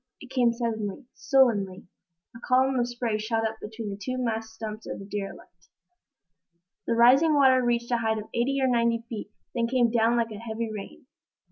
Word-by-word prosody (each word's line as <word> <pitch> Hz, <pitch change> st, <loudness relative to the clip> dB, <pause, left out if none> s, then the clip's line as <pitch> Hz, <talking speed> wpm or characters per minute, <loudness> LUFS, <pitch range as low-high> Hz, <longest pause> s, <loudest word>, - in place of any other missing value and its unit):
It 265 Hz, -, -13 dB
came 245 Hz, -3 st, +3 dB
suddenly, 230 Hz, -1 st, -3 dB
sullenly. 225 Hz, -, +2 dB, 0.5 s
A -, -, -9 dB
column 260 Hz, +1 st, +2 dB
of 240 Hz, -, +1 dB
spray 240 Hz, -3 st, -2 dB
shot 225 Hz, +1 st, 0 dB
up 220 Hz, 0 st, -6 dB
between 220 Hz, -1 st, -6 dB
the 200 Hz, +1 st, -8 dB
two 255 Hz, +4 st, -3 dB
mast 225 Hz, -3 st, -2 dB
stumps 220 Hz, 0 st, -7 dB
of -, -, -5 dB
the 195 Hz, -, -9 dB
derelict. 195 Hz, -3 st, -7 dB, 1.2 s
The 230 Hz, -, +1 dB
rising 270 Hz, +7 st, +6 dB
water 265 Hz, -2 st, +5 dB
reached 240 Hz, 0 st, 0 dB
a 240 Hz, -, +3 dB
height 220 Hz, -1 st, 0 dB
of 215 Hz, -, -6 dB
eighty 265 Hz, +4 st, 0 dB
or 265 Hz, -, +2 dB
ninety 235 Hz, -2 st, +1 dB
feet, 220 Hz, -3 st, -6 dB, 0.2 s
then 235 Hz, -2 st, 0 dB
came 240 Hz, -2 st, +2 dB
down 230 Hz, 0 st, +3 dB
again -, -, +1 dB
like 230 Hz, -1 st, 0 dB
a 210 Hz, -, -7 dB
heavy 225 Hz, 0 st, -4 dB
rain. 215 Hz, +8 st, -9 dB
235 Hz, 195 wpm, -26 LUFS, 220-250 Hz, 1.2 s, rising